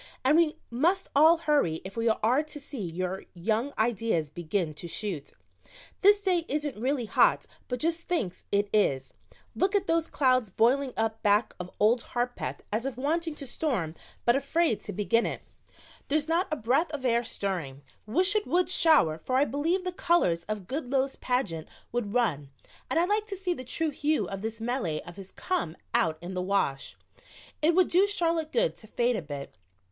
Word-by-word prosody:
"And 285 Hz, +3 st, +5 dB
we 330 Hz, -1 st, +3 dB, 0.2 s
must 345 Hz, +11 st, +1 dB
all 320 Hz, +4 st, +7 dB
hurry 290 Hz, -, +1 dB
if 195 Hz, -, -8 dB
we 230 Hz, 0 st, +1 dB
are 230 Hz, +5 st, +2 dB
to 305 Hz, -1 st, -8 dB
see 280 Hz, -4 st, -7 dB
your 185 Hz, +2 st, -3 dB
young 220 Hz, +9 st, 0 dB
ideas 220 Hz, -9 st, 0 dB
begin 170 Hz, 0 st, -2 dB
to 160 Hz, +3 st, -7 dB
shoot. 170 Hz, -5 st, -4 dB, 0.7 s
This 410 Hz, +1 st, +6 dB
day 370 Hz, -4 st, +1 dB
isn't 295 Hz, 0 st, -2 dB
really 260 Hz, -1 st, 0 dB
hot, -, -, +3 dB, 0.2 s
but 250 Hz, -, -2 dB
just 330 Hz, +3 st, -1 dB
thinks 235 Hz, -, -2 dB
it 205 Hz, 0 st, +2 dB
is. 135 Hz, -11 st, +1 dB, 0.4 s
Look 390 Hz, +2 st, +1 dB
at 395 Hz, -1 st, +2 dB
those 330 Hz, -2 st, +1 dB
clouds 255 Hz, -5 st, +2 dB
boiling 255 Hz, +7 st, +2 dB
up 225 Hz, 0 st, -1 dB
back 210 Hz, +2 st, +2 dB
of 180 Hz, 0 st, -6 dB
Old 230 Hz, +3 st, +4 dB
Harpeth 245 Hz, +1 st, -3 dB
as 225 Hz, +5 st, -1 dB
if 270 Hz, -, -5 dB
wanting 320 Hz, +4 st, -1 dB
to 280 Hz, -, -8 dB
storm, 240 Hz, -, -2 dB, 0.3 s
but 240 Hz, -, +5 dB
afraid 280 Hz, -2 st, +1 dB
to -, -, -6 dB
begin 230 Hz, +4 st, +1 dB
it. -, -, -5 dB, 0.6 s
There's 300 Hz, +1 st, +1 dB
not 335 Hz, +3 st, +1 dB
a -, -, +1 dB
breath 270 Hz, +6 st, +1 dB
of 285 Hz, -4 st, -5 dB
air 235 Hz, -1 st, +2 dB
stirring. 175 Hz, -, -4 dB, 0.2 s
Wish 365 Hz, -, +2 dB
it 425 Hz, -, +1 dB
would 360 Hz, +1 st, +2 dB
shower, 295 Hz, -, +4 dB
for 255 Hz, +10 st, -1 dB
I 280 Hz, -, +4 dB
believe 320 Hz, +8 st, 0 dB
the 365 Hz, -, -2 dB
colors 260 Hz, -, +1 dB
of 215 Hz, -3 st, -4 dB
Goodloe's 270 Hz, -, -1 dB
pageant 205 Hz, -11 st, -1 dB, 0.2 s
would 235 Hz, -4 st, -2 dB
run 150 Hz, -, +1 dB, 0.4 s
and 325 Hz, -, +2 dB
I'd 345 Hz, -, +2 dB
like 420 Hz, +1 st, +1 dB
to 395 Hz, -2 st, -5 dB
see 365 Hz, -1 st, -1 dB
the 255 Hz, -, -8 dB
true 315 Hz, +5 st, -1 dB
hue 300 Hz, +2 st, 0 dB
of 195 Hz, -1 st, -6 dB
this 225 Hz, +1 st, -4 dB
melee 225 Hz, -, -2 dB
of 175 Hz, -, -12 dB
his 195 Hz, -1 st, -10 dB
come 180 Hz, -, -2 dB, 0.2 s
out 155 Hz, -1 st, +2 dB
in 180 Hz, +2 st, -6 dB
the 180 Hz, -, -2 dB
wash. 180 Hz, -8 st, -1 dB, 0.6 s
It 325 Hz, +2 st, +3 dB
would 370 Hz, -1 st, +4 dB
do 375 Hz, +4 st, +4 dB
Charlotte 335 Hz, -5 st, 0 dB
good -, -, +1 dB
to 215 Hz, -, -11 dB
fade 240 Hz, +2 st, +1 dB
a 215 Hz, -, -2 dB
bit. 145 Hz, -, -7 dB
250 Hz, 190 wpm, -28 LUFS, 200-320 Hz, 0.7 s, all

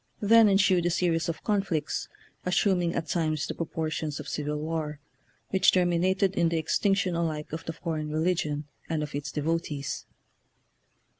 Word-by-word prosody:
Then 220 Hz, +1 st, +6 dB
ensued 190 Hz, -3 st, +4 dB
a -, -, +2 dB
series 170 Hz, -1 st, +1 dB
of 165 Hz, -, -4 dB
conflicts, 195 Hz, -8 st, -1 dB, 0.3 s
assuming 180 Hz, -1 st, +2 dB
at 165 Hz, -, -1 dB
times 155 Hz, -3 st, 0 dB
the -, -, -4 dB
proportions 155 Hz, -2 st, -3 dB
of -, -, -7 dB
civil 150 Hz, 0 st, -2 dB
war, 155 Hz, -1 st, -3 dB, 0.5 s
which 190 Hz, -, +5 dB
terminated 185 Hz, +2 st, +2 dB
in 170 Hz, -3 st, +2 dB
the 165 Hz, -, 0 dB
extinction 190 Hz, +4 st, +1 dB
alike 160 Hz, -3 st, -2 dB
of 165 Hz, +1 st, -5 dB
the 165 Hz, -, -3 dB
foreign 155 Hz, -2 st, -3 dB
religion 155 Hz, -2 st, 0 dB, 0.2 s
and 160 Hz, -2 st, 0 dB
of 150 Hz, -, -6 dB
its 145 Hz, 0 st, -4 dB
devotees. 150 Hz, -3 st, -2 dB
165 Hz, 150 wpm, -28 LUFS, 155-180 Hz, 0.5 s, Then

